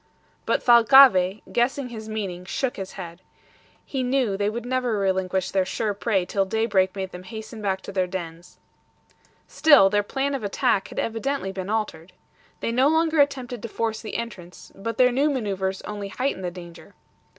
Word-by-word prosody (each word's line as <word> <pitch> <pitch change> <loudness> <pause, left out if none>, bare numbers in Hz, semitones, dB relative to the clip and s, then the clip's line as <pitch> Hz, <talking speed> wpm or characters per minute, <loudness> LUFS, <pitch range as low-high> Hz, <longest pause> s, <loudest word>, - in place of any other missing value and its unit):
But - - +1
Thalcave, 235 -5 +6
guessing 250 +2 0
his 220 -2 -8
meaning, 195 -5 -4
shook 245 +7 -2
his 190 -1 -6
head. 175 -2 -9 0.6
He 270 - -3
knew 250 -5 +1
they 205 +1 0
would 235 +2 -5
never 250 -3 -1
relinquish 190 -1 0
their 190 -1 +2
sure 205 +3 -2
prey 200 -2 0
till 195 +1 0
daybreak 195 -2 +1
made 190 -1 -4
them 180 - -9
hasten 220 +3 -9
back 190 -2 -1
to - - -8
their 185 -2 0
dens. 175 -2 -7 0.9
Still, 285 -12 +5
their 205 - +3
plan 270 +7 -2
of 270 - -3
attack 195 -1 +1
had - - -12
evidently 230 -1 -2
been 190 0 -6
altered. 190 -6 -3 0.5
They - - -1
no 255 +4 +3
longer 320 0 +3
attempted 255 -4 -1
to - - -5
force 225 0 -3
the 220 - -7
entrance, 195 -7 -8
but 225 +3 -5
their 250 0 +5
new 275 +5 +2
maneuvers 195 -8 -2
only 205 -1 -5
heightened 195 -1 -3
the - - -1
danger. 175 -1 -12
210 Hz, 175 wpm, -24 LUFS, 190-245 Hz, 0.9 s, Thalcave